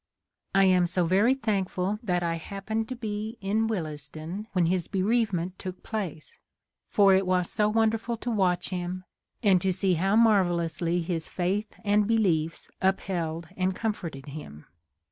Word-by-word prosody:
I 195 Hz, -, +6 dB
am 185 Hz, -2 st, +4 dB
so 180 Hz, 0 st, +1 dB
very 200 Hz, +9 st, +4 dB
thank 205 Hz, -8 st, -1 dB
ful 190 Hz, +3 st, -2 dB
that 180 Hz, -6 st, 0 dB
I 165 Hz, -1 st, 0 dB
happened 210 Hz, +6 st, -4 dB
to 255 Hz, -, -3 dB
be 220 Hz, 0 st, -4 dB
in 210 Hz, +3 st, 0 dB
Willesden 160 Hz, +1 st, -5 dB
when 180 Hz, -3 st, +3 dB
his 175 Hz, 0 st, 0 dB
bereavement 190 Hz, -3 st, 0 dB
took 185 Hz, -1 st, -7 dB
place, 190 Hz, -9 st, -5 dB, 0.5 s
for 200 Hz, -2 st, +5 dB
it 190 Hz, 0 st, +3 dB
was 180 Hz, -1 st, +1 dB
so 210 Hz, 0 st, +2 dB
wonderful 225 Hz, +1 st, +1 dB
to 240 Hz, +2 st, -3 dB
watch 185 Hz, -5 st, +1 dB
him, 180 Hz, 0 st, -4 dB, 0.4 s
and 190 Hz, -4 st, +5 dB
to 190 Hz, -, +1 dB
see 185 Hz, 0 st, +1 dB
how 190 Hz, +5 st, +2 dB
mar 220 Hz, -4 st, +6 dB
vellously 170 Hz, 0 st, -1 dB
his 165 Hz, -1 st, -3 dB
faith 195 Hz, +4 st, -2 dB
and 205 Hz, 0 st, +3 dB
beliefs 170 Hz, -8 st, +1 dB
upheld 170 Hz, -4 st, -1 dB
and 185 Hz, 0 st, 0 dB
comforted 170 Hz, -12 st, -4 dB
him. 140 Hz, -, -9 dB
190 Hz, 160 wpm, -27 LUFS, 175-210 Hz, 0.5 s, I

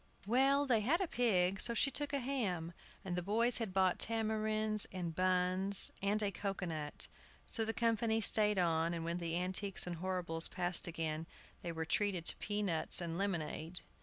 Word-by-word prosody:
Well, 270 Hz, +6 st, +3 dB
they 245 Hz, -5 st, +2 dB
had 275 Hz, -, +1 dB
a 380 Hz, -, -1 dB
pig; 195 Hz, -, +1 dB
so 235 Hz, -, -2 dB
she 275 Hz, +5 st, +2 dB
took 290 Hz, +1 st, -1 dB
a 285 Hz, -, 0 dB
ham, 210 Hz, -11 st, -3 dB, 0.3 s
and 180 Hz, -2 st, -3 dB
the 180 Hz, -, -1 dB
boys 225 Hz, +7 st, +1 dB
had 225 Hz, -5 st, -3 dB
bought 185 Hz, -1 st, +1 dB
tamarinds 215 Hz, -1 st, 0 dB
and 175 Hz, -3 st, -4 dB
buns 185 Hz, +2 st, +3 dB
and 205 Hz, +2 st, +1 dB
a 200 Hz, -, 0 dB
cocoa 195 Hz, -1 st, -4 dB
nut. 155 Hz, -3 st, -1 dB, 0.4 s
So 225 Hz, -, -3 dB
the 220 Hz, -, -1 dB
company 225 Hz, -1 st, +1 dB
stayed 210 Hz, -1 st, +5 dB
on, 165 Hz, -1 st, +1 dB
and 165 Hz, -1 st, -5 dB
when 170 Hz, +1 st, -3 dB
the 170 Hz, -1 st, -3 dB
Antiques 185 Hz, +2 st, +1 dB
and 175 Hz, -1 st, -5 dB
Horribles 175 Hz, -2 st, +1 dB
passed 180 Hz, -1 st, 0 dB
again 160 Hz, -1 st, -4 dB, 0.3 s
they 170 Hz, -, -5 dB
were 160 Hz, -1 st, -4 dB
treated 185 Hz, -1 st, 0 dB
to -, -, +3 dB
pea 205 Hz, 0 st, -3 dB
nuts 165 Hz, -5 st, +2 dB
and 170 Hz, -2 st, -4 dB
lemonade. 170 Hz, -2 st, -3 dB
190 Hz, 185 wpm, -35 LUFS, 175-220 Hz, 0.4 s, stayed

